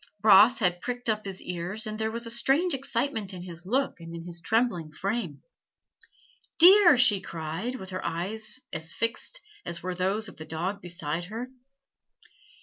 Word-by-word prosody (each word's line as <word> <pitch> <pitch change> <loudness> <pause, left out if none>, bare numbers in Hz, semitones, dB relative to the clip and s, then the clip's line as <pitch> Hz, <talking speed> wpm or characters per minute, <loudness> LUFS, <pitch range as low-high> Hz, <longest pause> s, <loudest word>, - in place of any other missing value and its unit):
Bras 215 +4 +7
had 180 -6 +1
pricked 245 -1 -3
up 215 -1 0
his 195 -1 -5
ears, 180 +5 -4
and 215 0 -5
there 220 0 0
was 235 +1 -4
a 230 - -3
strange 275 +9 +2
excitement 235 -6 -2
in 175 - -7
his 175 0 -8
look 270 +2 0
and 165 0 -9
in 165 - -7
his 170 0 -7
trembling 200 -6 0
frame. 185 - -3 1.1
"Deer!" 355 -3 +8
she 225 -6 +4
cried, 165 +8 -4
with 190 -6 -8
her 185 - -4
eyes 215 +7 -3
as 160 +1 -4
fixed 230 - -2 0.2
as 170 - -4
were 185 0 -2
those 195 +5 -1
of - - -11
the 155 - -7
dog 180 +6 -3
beside 170 -1 -4
her. 230 +6 -6
205 Hz, 170 wpm, -27 LUFS, 175-235 Hz, 1.1 s, Deer